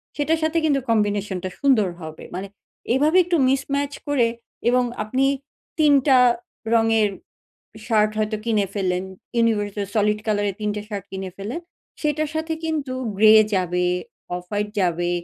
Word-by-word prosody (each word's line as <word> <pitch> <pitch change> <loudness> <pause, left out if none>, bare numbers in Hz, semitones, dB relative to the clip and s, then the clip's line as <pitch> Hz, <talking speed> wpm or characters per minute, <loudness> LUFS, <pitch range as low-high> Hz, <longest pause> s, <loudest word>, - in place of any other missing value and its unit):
সেটার 315 +2 +1
সাথে 315 +1 +1
কিন্তু 285 -3 +3
কম্বিনেশন 205 -3 +1
টা 185 - -2
সুন্দর 255 -9 +3
হবে। 160 -1 -8
মানে 190 +2 -4 0.5
এভাবে 305 +7 +3
একটু 345 -1 +1
মিসম্যাচ 280 +2 0
করে 275 -5 +3 0.4
এবং 250 +1 +3 0.2
আপনি 255 +5 +1 0.5
৩ 300 -2 +5
টা 265 -2 +6 0.6
রঙের 225 -2 +3 0.8
শার্ট 215 -2 +3
হয়তো 215 0 0
কিনে 215 -3 +2
ফেললেন, 185 -2 -1 0.3
ইউনিভার্সাল 205 -3 +1
সলিড 210 0 +2
কলার 205 -2 +1
এর 190 - -5
৩ 210 - 0
টা 210 - -3
শার্ট 200 -3 -5
কিনে 190 -1 -5
ফেললেন। 225 - -5 0.4
সেটার 300 0 0
সাথে 320 +1 -1
কিন্তু 300 -5 -2 0.2
গ্রে 215 +1 +7 0.2
যাবে, 180 -1 0 0.5
অফ-হোয়াইট 205 +4 -3
যাবে, 175 -1 0
215 Hz, 145 wpm, -22 LUFS, 200-280 Hz, 0.8 s, গ্রে